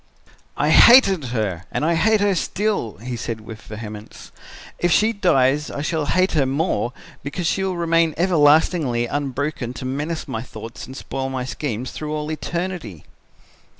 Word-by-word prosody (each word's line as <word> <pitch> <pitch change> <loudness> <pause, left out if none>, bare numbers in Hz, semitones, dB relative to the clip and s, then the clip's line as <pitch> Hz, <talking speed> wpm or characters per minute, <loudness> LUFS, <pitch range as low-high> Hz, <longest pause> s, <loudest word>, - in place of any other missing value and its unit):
"'I - - +1
hated 200 - +7
her 105 -8 -3
and 150 - -1
I 170 - +2
hate 215 +5 +3
her 205 -1 +3
still,' 190 - -1
he 120 +3 -6
said 115 -1 -4
with 110 0 -10
vehemence; 105 0 -9 0.5
'if 175 - +1
she 220 +6 +3
dies 150 - +2
I 140 - -5
shall 155 -2 -1
hate 185 +4 +2
her 140 -5 +2
more 135 - 0 0.3
because 145 +5 -4
she 190 +4 0
will 190 -2 -2
remain 165 -2 +2
everlastingly 155 -6 +3
unbroken 140 -1 -3
to 130 - -6
menace 150 +5 -3
my 110 - -4
thoughts 115 -1 -9
and 130 - -9
spoil 135 -1 -4
my 130 -1 -3
schemes 125 -3 -4
through 150 0 -5
all 150 0 -3
eternity.' 170 - -4
145 Hz, 160 wpm, -21 LUFS, 120-170 Hz, 0.5 s, hated